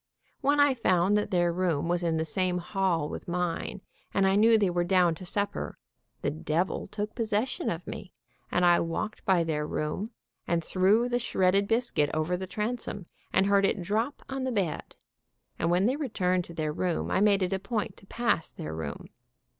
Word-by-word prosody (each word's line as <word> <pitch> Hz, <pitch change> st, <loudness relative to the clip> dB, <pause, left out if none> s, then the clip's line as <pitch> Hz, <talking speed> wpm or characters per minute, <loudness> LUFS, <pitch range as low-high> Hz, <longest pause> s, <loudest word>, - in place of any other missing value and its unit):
When 285 Hz, +1 st, +2 dB
I 285 Hz, -1 st, +6 dB
found 190 Hz, -5 st, +2 dB
that 210 Hz, -, +1 dB
their 175 Hz, -2 st, +2 dB
room 170 Hz, -3 st, 0 dB
was 175 Hz, 0 st, +1 dB
in 165 Hz, -2 st, 0 dB
the 160 Hz, -, 0 dB
same 180 Hz, +2 st, 0 dB
hall 180 Hz, -4 st, 0 dB
with -, -, -7 dB
mine, 175 Hz, +2 st, -2 dB, 0.3 s
and 195 Hz, -, +4 dB
I 190 Hz, 0 st, +3 dB
knew 225 Hz, +2 st, +6 dB
they 205 Hz, -2 st, +3 dB
were 175 Hz, 0 st, +1 dB
down 180 Hz, -1 st, +3 dB
to 175 Hz, +3 st, -9 dB
supper, 200 Hz, +3 st, -3 dB, 0.5 s
the -, -, +1 dB
devil 155 Hz, -, -1 dB
took 210 Hz, +1 st, -4 dB
possession 230 Hz, -, -1 dB
of 170 Hz, +1 st, -4 dB
me, 185 Hz, -, -7 dB, 0.4 s
and 180 Hz, -, +3 dB
I 175 Hz, 0 st, +6 dB
walked 170 Hz, +6 st, -3 dB
by 185 Hz, -3 st, +4 dB
their 150 Hz, -2 st, -1 dB
room 155 Hz, +10 st, -2 dB, 0.4 s
and 170 Hz, -1 st, +1 dB
threw 195 Hz, +8 st, +3 dB
the 245 Hz, 0 st, 0 dB
shredded 195 Hz, -3 st, +2 dB
bis 235 Hz, +3 st, +1 dB
cuit 145 Hz, -1 st, +2 dB
over 155 Hz, +3 st, 0 dB
the 190 Hz, +1 st, -5 dB
transom 210 Hz, -1 st, -3 dB, 0.3 s
and 190 Hz, -, +3 dB
heard 200 Hz, 0 st, +4 dB
it 195 Hz, +1 st, +2 dB
drop 220 Hz, +10 st, -1 dB
on 265 Hz, 0 st, -3 dB
the 260 Hz, -, -1 dB
bed, 195 Hz, -8 st, -2 dB, 0.6 s
and 165 Hz, -, +1 dB
when 180 Hz, +3 st, +3 dB
they 255 Hz, +4 st, +2 dB
returned 185 Hz, -, 0 dB
to 170 Hz, -, -11 dB
their 155 Hz, -2 st, -1 dB
room 175 Hz, +1 st, -1 dB
I -, -, +2 dB
made 200 Hz, -2 st, +4 dB
it 185 Hz, +1 st, -1 dB
a 190 Hz, -, 0 dB
point 215 Hz, +2 st, -3 dB
to 195 Hz, -, -18 dB
pass 235 Hz, -8 st, 0 dB
their 75 Hz, 0 st, -7 dB
room. 80 Hz, -3 st, -5 dB
185 Hz, 200 wpm, -28 LUFS, 170-210 Hz, 0.6 s, I